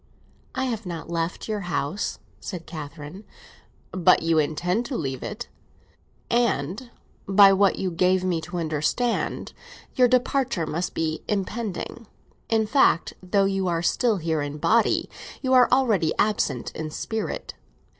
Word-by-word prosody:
"I 260 Hz, 0 st, 0 dB
have 230 Hz, -5 st, -3 dB
not 170 Hz, -1 st, -6 dB
left 165 Hz, +1 st, -2 dB
your 215 Hz, -1 st, -2 dB
house!" 165 Hz, +3 st, -2 dB, 0.2 s
said 175 Hz, -4 st, -7 dB
Catherine. 150 Hz, +4 st, -8 dB, 0.7 s
"But 180 Hz, -3 st, +4 dB
you 165 Hz, -1 st, +3 dB
intend 175 Hz, +8 st, 0 dB
to 265 Hz, -, -3 dB
leave 135 Hz, -4 st, -3 dB
it, 220 Hz, +3 st, -6 dB, 0.8 s
and 235 Hz, -, 0 dB, 0.4 s
by 195 Hz, 0 st, +7 dB
what 195 Hz, 0 st, +3 dB
you 185 Hz, -1 st, -2 dB
gave 185 Hz, +2 st, +2 dB
me 175 Hz, -3 st, 0 dB
to 175 Hz, +3 st, -6 dB
understand, 165 Hz, -, -1 dB, 0.4 s
your 250 Hz, -1 st, +5 dB
departure 250 Hz, -6 st, +1 dB
must 170 Hz, +4 st, -3 dB
be 160 Hz, -1 st, -2 dB
impending. 210 Hz, +2 st, -3 dB, 0.4 s
In 220 Hz, -1 st, +2 dB
fact, 215 Hz, -6 st, +3 dB
though 195 Hz, +2 st, +2 dB
you 195 Hz, -1 st, 0 dB
are 170 Hz, -1 st, 0 dB
still 225 Hz, +4 st, +2 dB
here 160 Hz, -3 st, -1 dB
in 145 Hz, +1 st, -4 dB
body, 225 Hz, +9 st, +2 dB, 0.4 s
you 260 Hz, 0 st, +1 dB
are 250 Hz, -1 st, +6 dB
already 220 Hz, -11 st, +3 dB
absent 205 Hz, -, 0 dB
in 155 Hz, -1 st, -5 dB
spirit. 220 Hz, +7 st, -4 dB
185 Hz, 140 wpm, -25 LUFS, 165-225 Hz, 0.8 s, by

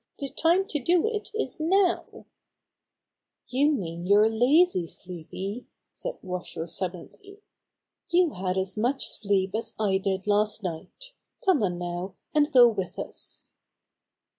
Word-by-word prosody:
The 275 Hz, -, -5 dB
time 345 Hz, +7 st, +2 dB
to 295 Hz, -, 0 dB
do 345 Hz, +4 st, +3 dB
it 440 Hz, -2 st, -2 dB
is 440 Hz, -5 st, -3 dB
now/' 360 Hz, +3 st, +1 dB, 1.2 s
"You 280 Hz, +4 st, +3 dB
mean 175 Hz, -, -4 dB
you're 205 Hz, +2 st, +5 dB
lazy, 245 Hz, -, +3 dB
Sleepy," 190 Hz, +7 st, -6 dB, 0.3 s
said -, -, -5 dB
Washer 180 Hz, -3 st, -5 dB
suddenly. 190 Hz, -, -7 dB, 0.7 s
"You 345 Hz, -1 st, +3 dB
had 185 Hz, -2 st, -3 dB
as 190 Hz, 0 st, 0 dB
much 245 Hz, +6 st, 0 dB
sleep 200 Hz, -2 st, +1 dB
as 225 Hz, +1 st, -1 dB
I 195 Hz, -3 st, +2 dB
did 190 Hz, -1 st, -2 dB
last 210 Hz, +1 st, +2 dB
night. 190 Hz, -, -7 dB, 0.3 s
Come 375 Hz, -, +4 dB
on 180 Hz, -4 st, 0 dB
now, 175 Hz, +2 st, -5 dB, 0.2 s
and 300 Hz, 0 st, +3 dB
go 250 Hz, -3 st, +8 dB
with 195 Hz, -6 st, -3 dB
us." -, -, -1 dB
215 Hz, 135 wpm, -26 LUFS, -, 1.2 s, go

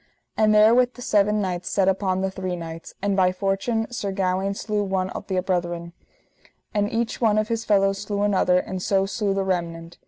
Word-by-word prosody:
And 215 Hz, -1 st, +3 dB
therewith 235 Hz, +4 st, +5 dB
the 245 Hz, -, -11 dB
seven 210 Hz, 0 st, +2 dB
knights 180 Hz, -2 st, -3 dB
set 195 Hz, -2 st, +1 dB
upon 190 Hz, -1 st, +1 dB
the 190 Hz, 0 st, -1 dB
three 185 Hz, -1 st, -4 dB
knights, 165 Hz, -1 st, -8 dB
and 200 Hz, -1 st, +1 dB
by 185 Hz, -1 st, +3 dB
fortune 195 Hz, +5 st, -1 dB
Sir 205 Hz, -5 st, -3 dB
Gawaine 190 Hz, +1 st, -1 dB
slew 210 Hz, 0 st, -2 dB
one 190 Hz, -1 st, -1 dB
of -, -, -7 dB
the 185 Hz, -1 st, 0 dB
brethren, 175 Hz, -2 st, -2 dB, 0.8 s
and 205 Hz, 0 st, 0 dB
each 230 Hz, +1 st, -2 dB
one 215 Hz, -2 st, +3 dB
of 215 Hz, 0 st, 0 dB
his 230 Hz, -1 st, -2 dB
fellows 195 Hz, -1 st, +2 dB
slew 205 Hz, 0 st, -2 dB
another, 190 Hz, -3 st, +3 dB
and 185 Hz, 0 st, -3 dB
so 195 Hz, +1 st, +1 dB
slew 200 Hz, 0 st, -1 dB
the 195 Hz, -, 0 dB
remnant. 170 Hz, -2 st, -3 dB
195 Hz, 195 wpm, -24 LUFS, 185-210 Hz, 0.8 s, therewith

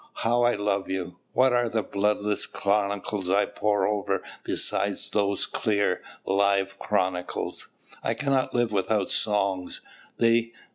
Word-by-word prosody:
How 120 Hz, +1 st, +1 dB
I 120 Hz, 0 st, +4 dB
love 100 Hz, -1 st, -1 dB
you. 90 Hz, -1 st, -3 dB, 0.2 s
What 130 Hz, 0 st, +4 dB
are 120 Hz, -1 st, +2 dB
the 110 Hz, -1 st, 0 dB
bloodless 105 Hz, +1 st, 0 dB
chronicles 100 Hz, -1 st, -1 dB
I 100 Hz, +2 st, +4 dB
pore 105 Hz, 0 st, 0 dB
over 100 Hz, -2 st, 0 dB, 0.2 s
beside -, -, +1 dB, 0.2 s
those 100 Hz, -1 st, +1 dB
clear, 100 Hz, -4 st, 0 dB, 0.2 s
live 100 Hz, 0 st, +1 dB
chronicles! 95 Hz, -3 st, -2 dB, 0.4 s
I -, -, 0 dB
cannot 135 Hz, -2 st, +1 dB
live 120 Hz, -2 st, +2 dB
without 100 Hz, 0 st, 0 dB
songs; 100 Hz, -3 st, 0 dB, 0.4 s
they... 115 Hz, 0 st, +3 dB
105 Hz, 130 wpm, -26 LUFS, 100-110 Hz, 0.4 s, I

